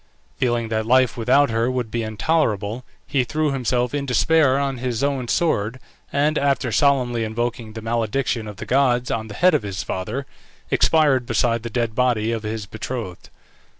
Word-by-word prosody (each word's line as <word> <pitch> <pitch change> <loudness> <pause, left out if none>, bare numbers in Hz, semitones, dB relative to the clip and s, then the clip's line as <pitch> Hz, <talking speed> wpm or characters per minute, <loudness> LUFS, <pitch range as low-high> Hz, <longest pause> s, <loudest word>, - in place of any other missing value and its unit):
Feeling 120 -3 0
that 110 0 -1
life 130 -1 +4
without 130 +3 +3
her 115 +2 +1
would 125 -4 -2
be 120 - -1
intolerable, 110 -1 -1 0.2
he 135 -3 +1
threw 150 +4 -1
himself 125 -1 0
in 140 -1 -2
despair 135 +1 +3
on 135 -2 -1
his 125 0 -2
own 135 -3 -1
sword, 115 -6 0 0.3
and 150 +2 +1
after 140 -3 +1
solemnly 125 -4 +2
invoking 115 0 -3
the 110 0 -8
malediction 115 0 -1
of 105 -2 -8
the - - -6
gods 125 -1 +2
on 110 -1 -2
the 105 - -9
head 180 0 +4
of 150 - +2
his 100 -3 -4
father, 105 +9 -4 0.5
expired 145 -6 +3
beside 115 -1 +1
the 115 - -5
dead 115 -1 -1
body 115 -2 +1
of 115 -1 -2
his 110 -1 -4
betrothed. 110 -3 -6
120 Hz, 175 wpm, -22 LUFS, 110-135 Hz, 0.5 s, life